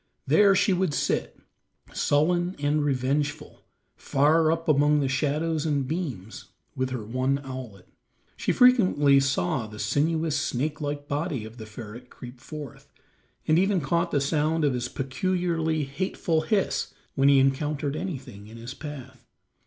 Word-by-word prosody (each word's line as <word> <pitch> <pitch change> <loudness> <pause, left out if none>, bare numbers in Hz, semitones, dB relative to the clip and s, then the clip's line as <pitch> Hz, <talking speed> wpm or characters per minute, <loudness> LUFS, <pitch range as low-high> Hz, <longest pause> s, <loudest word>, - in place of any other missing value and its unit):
There 200 -2 +5
she 190 - +3
would 180 -5 0
sit, - - -1 0.6
sullen 175 +5 +1
and 145 +1 +1
revengeful, 145 +2 -1 0.3
far 155 +3 +3
up 165 0 -2
among 150 0 +4
the 140 - +1
shadows 150 +4 0
and 145 -4 0
beams, 130 - -5 0.3
with 130 0 -1
her 125 -4 -4
one 130 +4 0
owlet. 125 -8 -8 0.5
She - - -1
frequently 185 - +5
saw 130 -4 0
the 105 0 -11
sinuous, 155 +8 0
snake 150 +5 -2
like 145 0 -4
body 145 -5 -2
of 110 +2 -11
the 110 -2 -9
ferret 115 +3 -10
creep 125 0 -11
forth, 150 -5 -9 0.6
and 155 +2 +4
even 195 0 +2
caught 170 +4 0
the 145 - +1
sound 155 +2 +1
of 140 - +2
his 125 0 -3
peculiarly 160 +3 -1
hateful 160 +3 -1
hiss 195 +5 -1 0.2
when 135 +1 +3
he 140 - +6
encountered 140 +2 +1
anything 135 - -6
in 115 +2 -11
his 120 +3 -7
path. 145 -3 -10
145 Hz, 145 wpm, -26 LUFS, 130-160 Hz, 0.6 s, he